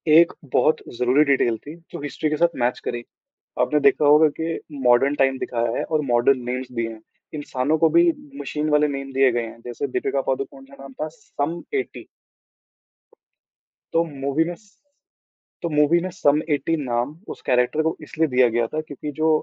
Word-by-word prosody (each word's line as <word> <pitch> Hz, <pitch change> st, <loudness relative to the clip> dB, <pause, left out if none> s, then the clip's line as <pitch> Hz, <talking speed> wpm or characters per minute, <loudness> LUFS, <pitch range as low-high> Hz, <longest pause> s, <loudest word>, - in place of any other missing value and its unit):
एक 170 Hz, +1 st, +6 dB, 0.2 s
बहुत 155 Hz, -, +4 dB, 0.2 s
ज़रूरी 125 Hz, +5 st, +4 dB
डिटेल 120 Hz, -4 st, +2 dB
थी, 150 Hz, +7 st, -11 dB, 0.2 s
जो -, -, -7 dB
हिस्ट्री 150 Hz, +2 st, -2 dB
के 155 Hz, -, -1 dB
साथ 170 Hz, +1 st, +2 dB
मैच 125 Hz, +1 st, 0 dB
करी। 120 Hz, 0 st, -3 dB, 0.6 s
आपने 150 Hz, -, +2 dB
देखा 145 Hz, -, +1 dB
होगा 150 Hz, +2 st, +7 dB
कि 165 Hz, 0 st, -2 dB, 0.3 s
मॉडर्न 125 Hz, +4 st, +4 dB
टाइम 135 Hz, -1 st, +2 dB
दिखाया 115 Hz, -2 st, -2 dB
है -, -, 0 dB
और 155 Hz, -1 st, 0 dB
मॉडर्न 125 Hz, +2 st, +3 dB
नेम्स 125 Hz, +1 st, -4 dB
दिए 115 Hz, -1 st, -2 dB
हैं, 110 Hz, -, -12 dB, 0.3 s
इंसानों 145 Hz, +1 st, -1 dB
को 165 Hz, -, +5 dB
भी 345 Hz, 0 st, +6 dB, 0.3 s
मशीन 150 Hz, 0 st, -2 dB
वाले 150 Hz, 0 st, +4 dB
नेम 135 Hz, 0 st, -7 dB
दिए 135 Hz, 0 st, +4 dB
गए 120 Hz, -1 st, -1 dB
हैं। 115 Hz, -, -12 dB
जैसे 120 Hz, +4 st, -3 dB
दीपिका 135 Hz, +1 st, -1 dB
पादुकोण 135 Hz, 0 st, -3 dB
का 140 Hz, -, -13 dB
नाम 135 Hz, -1 st, -10 dB
था 155 Hz, -, -1 dB
सम 165 Hz, +4 st, -4 dB, 0.2 s
80 -, -, -12 dB, 1.9 s
तो 165 Hz, +1 st, +3 dB, 0.2 s
मूवी 140 Hz, +4 st, +1 dB
में 175 Hz, -, -5 dB
स 205 Hz, +1 st, -26 dB, 0.9 s
तो 170 Hz, -, -2 dB
मूवी 150 Hz, +2 st, +3 dB
में 185 Hz, -, -3 dB
सम 150 Hz, -4 st, +2 dB
80 145 Hz, +3 st, 0 dB
नाम, 125 Hz, +1 st, -2 dB
उस -, -, -8 dB
कैरेक्टर 125 Hz, +5 st, +2 dB
को 160 Hz, -, 0 dB
इसलिए 160 Hz, +1 st, 0 dB
दिया 125 Hz, 0 st, +4 dB
गया 120 Hz, 0 st, +2 dB
था 155 Hz, +6 st, -3 dB
क्योंकि 150 Hz, +1 st, -6 dB
जो, 160 Hz, 0 st, +3 dB
145 Hz, 185 wpm, -23 LUFS, 125-155 Hz, 1.9 s, होगा